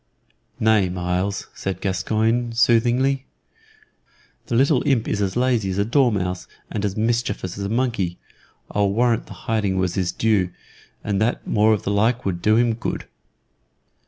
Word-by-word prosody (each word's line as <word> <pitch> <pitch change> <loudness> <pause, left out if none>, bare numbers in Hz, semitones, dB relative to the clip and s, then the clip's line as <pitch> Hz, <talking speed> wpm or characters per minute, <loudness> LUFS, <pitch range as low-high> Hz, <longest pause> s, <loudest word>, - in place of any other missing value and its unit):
"Nay, 110 -4 +3
Myles," 90 +2 -2
said 95 -2 -4
Gascoyne, 110 +5 0
soothingly, 125 +4 +2 1.2
"the 120 - -1
little 135 +2 +3
imp 125 -5 +2
is 105 - -1
as 95 -1 -1
lazy 120 -5 +1
as 95 - -3
a 100 - +2
dormouse 105 -8 +1 0.2
and 105 - -3
as 100 -1 -2
mischievous 110 -5 -1
as 100 - -4
a - - -3
monkey. 115 -7 -1 0.5
I'll 100 -1 +2
warrant 115 +2 +1
the - - -9
hiding 105 -4 0
was 95 -2 0
his 90 -2 -1
due, 105 -5 +1 0.5
and 100 -1 -1
that 115 +3 0
more 110 0 +3
of 105 - +1
the 100 - -1
like 115 +5 +1
would 90 -3 -2
do 110 +3 +3
him 120 0 +3
good." 115 - -4
110 Hz, 160 wpm, -22 LUFS, 95-120 Hz, 1.2 s, Nay